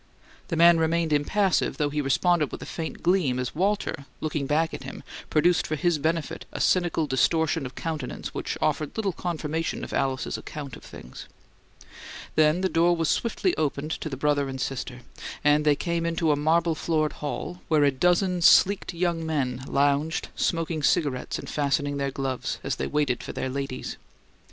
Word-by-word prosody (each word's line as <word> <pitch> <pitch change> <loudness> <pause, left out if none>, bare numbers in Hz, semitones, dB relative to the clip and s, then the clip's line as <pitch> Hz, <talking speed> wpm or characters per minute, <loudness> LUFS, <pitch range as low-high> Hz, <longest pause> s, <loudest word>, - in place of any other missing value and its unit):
The 170 - -2
man 170 0 +6
remained 160 0 +1
impassive, 190 +6 +1
though 145 -2 0
he 150 0 0
responded 150 +3 +2
with - - -6
a - - -7
faint 160 -2 -6
gleam 170 -8 +2
as 125 -1 -3
Walter, 190 -5 -1
looking 150 -3 -2
back 160 +3 +1
at - - -6
him, - - -8 0.3
produced 170 +3 +3
for 155 - -1
his 160 +1 +1
benefit 160 +1 -2
a - - -6
cynical 175 -3 +2
distortion 155 +1 +1
of 125 - -13
countenance 160 -2 -5
which - - -3
offered 150 +5 -1
little 205 -3 0
confirmation 165 -2 -3
of - - -6
Alice's 130 -1 -1
account 145 -3 -7
of - - -14
things. - - -11 1.1
Then 155 +3 +3
the 190 - +2
door 175 0 +3
was 165 -2 0
swiftly 290 - 0
opened 150 0 -1
to 155 - -3
the 135 - -5
brother 145 0 +1
and 130 0 -5
sister; 125 -2 -4 0.4
and 150 0 +4
they 150 -1 +5
came 170 +2 -2
into 165 -1 +1
a - - +3
marble 165 +3 +2
floored 155 -1 0
hall, 165 +4 -4
where 155 -2 +3
a 140 - +4
dozen 180 +5 +2
sleeked 185 +1 +5
young 170 -1 0
men 130 -6 -2
lounged, 145 +3 +1
smoked 165 -2 -1
cigarettes 140 -4 +1
and - - -8
fastened 145 0 0
their 140 0 0
gloves, 135 -1 -3
as - - -2
they - - -2
waited 145 -5 0
for - - -7
their 130 - -3
ladies. 135 -1 -4
155 Hz, 180 wpm, -26 LUFS, 140-170 Hz, 1.1 s, man